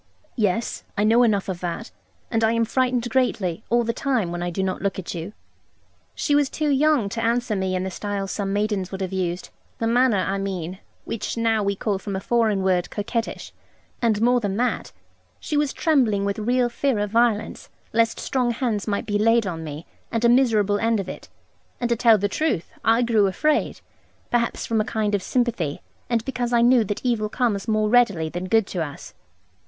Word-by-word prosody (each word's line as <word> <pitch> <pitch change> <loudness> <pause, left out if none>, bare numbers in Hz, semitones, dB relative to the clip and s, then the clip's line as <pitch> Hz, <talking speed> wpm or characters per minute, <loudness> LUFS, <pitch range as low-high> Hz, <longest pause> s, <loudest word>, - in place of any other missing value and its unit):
'Yes, 215 -1 -1
I 205 - +2
know 225 +3 +5
enough 210 -5 +2
of 185 -3 -3
that; 180 +6 -5 0.4
and 225 -1 +1
I 220 +1 +3
am 230 0 +2
frightened 250 0 0
greatly, 220 -7 0
all 240 +1 +3
the 230 0 -1
time, 240 -9 0
when 175 0 -4
I 175 - -1
do 185 +2 -2
not 185 -1 -2
look 195 -1 -1
at 190 - -5
you.' 170 +3 -5 0.8
She 290 - 0
was 290 -2 +3
too 305 -1 -1
young 285 -4 +3
to 230 +3 -3
answer 235 -1 +1
me 190 -1 -1
in 185 - -1
the 190 - -3
style 200 +1 -3
some 195 0 -3
maidens 205 -2 -1
would 190 0 -5
have 190 0 -3
used; 180 -1 -2 0.3
the 230 - -2
manner, 240 -1 +3
I 195 +1 -1
mean, 185 -2 -4 0.3
which 230 - -4
now 225 -1 +2
we 200 0 0
call 200 0 -1
from 200 0 -5
a - - -1
foreign 215 -2 +1
word 180 -2 +1
'coquettish.' 225 +2 -4 0.5
And 225 -2 +2
more 245 +1 +4
than 205 -3 -2
that, 245 0 -1 0.5
she - - -4
was 295 -1 +2
trembling 240 - +2
from 210 +1 -6
real 250 0 +3
fear 260 0 0
of 205 -1 -2
violence, 230 -2 +1 0.2
lest 230 0 +2
strong 255 -3 0
hands 230 -4 -1
might 200 -1 -1
be 205 -1 0
laid 225 +1 +3
on 165 -4 -4
me, 155 +1 -7 0.3
and 230 0 0
a - - +6
miserable 220 -5 +3
end 225 0 +1
of 190 -2 -4
it. - - -9 0.5
And 240 - -1
to - - +4
tell 225 -1 +5
the 205 0 0
truth, 240 - -1
I 230 +2 +4
grew 220 -4 +3
afraid; 305 +11 0 0.5
perhaps 235 -1 0
from 225 -1 +1
a - - +1
kind 210 -1 -1
of 200 - +1
sympathy, 230 - -1 0.3
and 230 -1 0
because 250 -2 -2
I 235 - +4
knew 245 -1 +5
that 205 +5 -4
evil 220 -4 +1
comes 215 -4 -1
more 215 -1 +2
readily 210 -9 +3
than 175 +3 -5
good 225 +2 +3
to 180 -3 -3
us. 145 -2 -9
220 Hz, 205 wpm, -23 LUFS, 195-240 Hz, 0.8 s, a